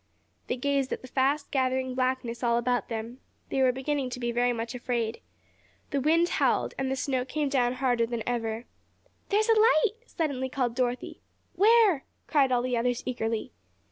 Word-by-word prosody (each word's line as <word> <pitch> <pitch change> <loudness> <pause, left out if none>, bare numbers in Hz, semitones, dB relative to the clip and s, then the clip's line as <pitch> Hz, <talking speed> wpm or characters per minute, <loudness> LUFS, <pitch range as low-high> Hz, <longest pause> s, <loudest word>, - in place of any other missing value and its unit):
They 250 - -1
gazed 275 0 0
at - - -4
the - - -8
fast 275 +3 0
gathering 260 -1 0
blackness 255 -2 -1
all 235 -1 +2
about 245 +1 0
them. 230 +2 -5 0.3
They 270 - 0
were 260 -1 +5
beginning 265 +1 -2
to 250 - -6
be 240 -1 -1
very 245 +1 +2
much 230 0 -4
afraid. 235 -2 -2 0.7
The 280 -2 0
wind 330 +4 +3
howled, - - +1
and 265 -1 -1
the 265 - 0
snow 260 -1 -1
came 290 +2 -2
down 250 -3 +2
harder 245 -3 +1
than 235 -2 -3
ever. 230 -1 -2 0.6
"There's 425 +2 +2
a - - +7
light!" 440 -1 +4
suddenly 275 -5 -2
called 250 -3 -1
Dorothy. 250 0 -2 0.3
"Where?" 425 -7 +5 0.2
cried 275 -4 +3
all 245 -1 +2
the 250 -1 0
others 240 +1 0
eagerly. 225 -3 -2
255 Hz, 175 wpm, -28 LUFS, 240-275 Hz, 0.7 s, a